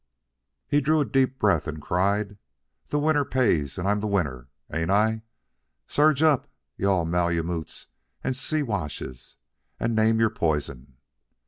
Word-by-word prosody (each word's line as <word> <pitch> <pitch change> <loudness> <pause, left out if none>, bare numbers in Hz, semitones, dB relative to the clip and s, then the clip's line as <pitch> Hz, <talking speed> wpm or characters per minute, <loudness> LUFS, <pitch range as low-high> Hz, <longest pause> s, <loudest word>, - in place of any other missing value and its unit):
He 145 - +2
drew 155 +3 +2
a 145 - +2
deep 130 -1 +1
breath 100 -6 +2
and 80 0 -4
cried: 100 +5 0 0.5
"The - - -1
winner 150 0 +2
pays, 80 - +1
and 90 - -2
I'm 105 +1 +2
the 105 - -2
winner, 70 -11 -1 0.2
ain't 80 +2 -1
I? 110 +3 +2 0.6
Surge 150 0 +3
up, 150 -5 +3 0.3
you 100 - 0
all 90 -4 +2
Malemutes 85 -1 -1 0.4
and 130 - -1
Siwashes, 105 - -3 0.4
and 115 0 0
name 110 +1 +3
your 110 -1 +3
poison! 70 - -2
100 Hz, 140 wpm, -25 LUFS, 80-130 Hz, 0.6 s, Surge